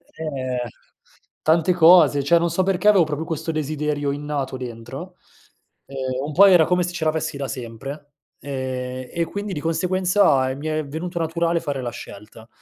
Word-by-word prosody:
Eh, 130 -6 -3 0.7
tante 165 +3 +3
cose. 160 -5 +6
Cioè, 170 +5 +4
non 170 0 0
so 180 +3 0
perché 195 +2 0
avevo 195 -5 +6
proprio 155 +1 -3
questo 165 0 -3
desiderio 150 -1 -2
innato 145 -2 -3
dentro, 125 +9 -8 0.7
ehm, 130 0 -4
un 150 - -5
po' 200 +5 +7
era 175 -5 +6
come 180 0 +1
se 175 0 -4
ce 160 -2 -3
l'avessi 155 -1 -1
da 140 - -3
sempre, 135 +5 -7 0.3
ehm, 130 -2 -5
e 170 0 0
quindi 200 +2 -5
di 150 - -3
conseguenza 180 -4 +2
e 130 - -3
mi 150 +3 -6
è 155 -1 -1
venuto 170 +4 -5
naturale 170 +1 0
fare 140 -4 -4
la 120 - -4
scelta. 110 +1 -11
150 Hz, 170 wpm, -22 LUFS, 135-170 Hz, 0.7 s, po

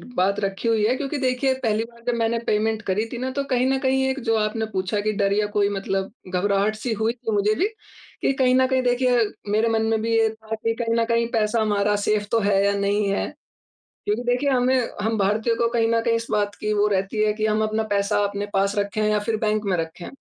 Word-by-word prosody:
बात 200 +3 +1
रखी 195 +3 -2
हुई 220 -2 +2
है 250 - +2
क्योंकि 285 +2 -3
देखिए 260 0 +1
पहली 220 0 +1
बार 235 0 -14
जब 245 - +2
मैंने 230 +1 +1
पेमेंट 215 +1 +1
करी 205 +3 -1
थी - - -4
ना, 260 +1 -3
तो 280 +1 -2
कहीं 255 -2 0
न 265 - +1
कहीं 265 0 +1
एक 265 +1 -2
जो 225 - +4
आपने 215 +1 -1
पूछा 190 +2 -1
कि 215 - 0
डर 200 0 +1
या 210 0 +1
कोई 200 0 +3
मतलब 195 -1 -2 0.2
घबराहट 200 +3 +1
सी 225 +2 -3
हुई 220 +2 0
थी, 235 -2 -5
मुझे 210 +1 +2
भी 395 - +1 0.5
कि - - +2
कहीं 255 -1 +4
न 260 0 +4
कहीं 260 -1 +1
देखिए 245 0 +2 0.3
मेरे 220 +2 +2
मन 225 -1 +1
में 225 -1 +1
भी 230 0 0
ये 225 -1 +3
था 220 0 -6
कि 225 +1 -1
कहीं 230 -1 -1
न - - +2
कहीं 230 0 +1
पैसा 220 0 +1
हमारा 205 -1 +1
सेफ़ 210 -1 +1
तो 230 - +3
है 200 -2 +2
या 200 - +2
नहीं 200 +1 +1
है 200 - -1 0.8
क्योंकि 210 +4 -1
देखिए 245 +4 +1
हमें 255 0 +2 0.3
हम 220 +1 0
भारतीयों 215 +4 +1
को 235 - +1
कहीं 225 -1 +2
न 230 0 +2
कहीं 230 - +2
इस 230 0 -4
बात 205 -1 0
की 215 0 -1
वो 205 0 +3
रहती 195 +2 0
है 210 - +2
कि 215 0 -1
हम 215 0 +1
अपना 215 +1 0
पैसा 200 +1 +1
अपने 200 0 -3
पास 195 +1 +1
रखें 205 +1 -1
या 210 0 +2
फिर 225 -1 +1
बैंक 215 0 0
में 195 -3 +1
रखें। 165 +1 -5
220 Hz, 245 wpm, -23 LUFS, 205-235 Hz, 0.8 s, जो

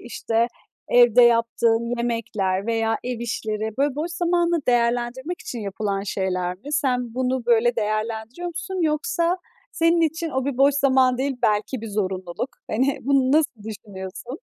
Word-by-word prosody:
işte, 230 -1 -1 0.4
evde 245 0 +6
yaptığın 235 0 +2
yemekler 210 -5 -1
veya 225 -1 +1
ev 245 -2 -3
işleri, 220 -2 -3
böyle, 280 -1 +2
boş 315 +4 -3
zamanını 345 -1 +1
değerlendirmek 245 +6 0
için 240 - -6
yapılan 200 0 -2
şeyler 185 -2 -2
mi? 270 +11 -10
Sen, 250 -5 0
bunu 255 -1 -1
böyle 240 0 +3
değerlendiriyor 220 +8 -2
musun 350 +3 -5
yoksa 335 +3 +1 0.4
senin 330 +1 +3
için 325 +1 0
o 265 -2 -1
bir 280 -2 -2
boş 275 +1 +5
zaman 260 -2 +3
değil, 270 -1 -1
belki 215 +3 +1
bir 225 - -6
zorunluluk. 190 +1 -3 0.2
Hani, 260 +5 +1
bunu 270 0 +2
nasıl 290 -8 +1
düşünüyorsun? 210 - -8
240 Hz, 145 wpm, -23 LUFS, 220-280 Hz, 0.4 s, evde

